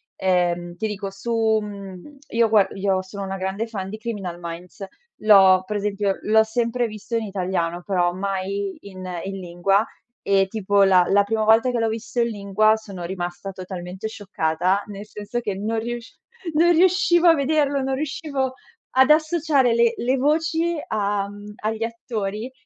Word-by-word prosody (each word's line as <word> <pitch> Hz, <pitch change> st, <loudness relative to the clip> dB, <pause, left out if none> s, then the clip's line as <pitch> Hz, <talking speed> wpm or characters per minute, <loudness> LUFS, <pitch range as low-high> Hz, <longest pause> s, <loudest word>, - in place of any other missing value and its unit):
ehm, 175 Hz, -2 st, 0 dB
ti 220 Hz, -, -1 dB
dico 200 Hz, -1 st, -5 dB
su 220 Hz, +1 st, +1 dB
mhmm, 200 Hz, +5 st, -9 dB
io 230 Hz, 0 st, +3 dB
gua 215 Hz, -3 st, +5 dB
io 195 Hz, -1 st, 0 dB
sono 195 Hz, +1 st, -7 dB
una 195 Hz, 0 st, -4 dB
grande 190 Hz, +4 st, -3 dB
fan 195 Hz, -4 st, -5 dB
di 215 Hz, -, -6 dB
Criminal 200 Hz, -6 st, -5 dB
Minds. 170 Hz, +3 st, -7 dB, 0.4 s
L'ho 190 Hz, -3 st, +7 dB
Per 210 Hz, -, -3 dB
esempio 200 Hz, -1 st, -1 dB
l'ho 220 Hz, +1 st, +4 dB
sempre 235 Hz, +1 st, -1 dB
visto 215 Hz, +2 st, -4 dB
in 225 Hz, -, -2 dB
italiano, 180 Hz, -3 st, -2 dB
però 175 Hz, -3 st, +1 dB
mai 195 Hz, +1 st, -3 dB
in 185 Hz, -2 st, -9 dB, 0.2 s
in 195 Hz, 0 st, -5 dB
lingua 185 Hz, +4 st, +1 dB, 0.4 s
e 195 Hz, -1 st, +2 dB
tipo, 205 Hz, -1 st, +2 dB
la 185 Hz, -2 st, +5 dB
la 200 Hz, +1 st, +5 dB
prima 220 Hz, +2 st, -1 dB
volta 225 Hz, +3 st, +5 dB
che 245 Hz, -, -1 dB
l'ho 225 Hz, -, +1 dB
visto 230 Hz, +2 st, -4 dB
in 235 Hz, -, +3 dB
lingua, 215 Hz, 0 st, +2 dB
sono 200 Hz, -5 st, -8 dB
rimasta 175 Hz, +1 st, -5 dB
totalmente 185 Hz, +1 st, -6 dB
scioccata, 190 Hz, -2 st, -1 dB
nel 205 Hz, 0 st, -8 dB
senso 210 Hz, +3 st, -5 dB
che 210 Hz, -5 st, -3 dB
non 220 Hz, +3 st, -2 dB
riusc 235 Hz, +1 st, -6 dB, 0.4 s
non 335 Hz, +3 st, +4 dB
riuscivo 350 Hz, 0 st, +4 dB
a -, -, +8 dB
vederlo, 285 Hz, -1 st, +1 dB
non 265 Hz, 0 st, -1 dB
riuscivo 275 Hz, -2 st, -2 dB, 0.4 s
ad 260 Hz, +1 st, +4 dB
associare 305 Hz, -5 st, +3 dB
le 235 Hz, 0 st, +3 dB
le 255 Hz, +3 st, 0 dB
voci 320 Hz, +4 st, +1 dB
a 205 Hz, -1 st, -1 dB
mhmm, 205 Hz, +1 st, -10 dB
agli 220 Hz, +1 st, -3 dB
attori, 225 Hz, 0 st, -4 dB
210 Hz, 165 wpm, -23 LUFS, 190-235 Hz, 0.4 s, a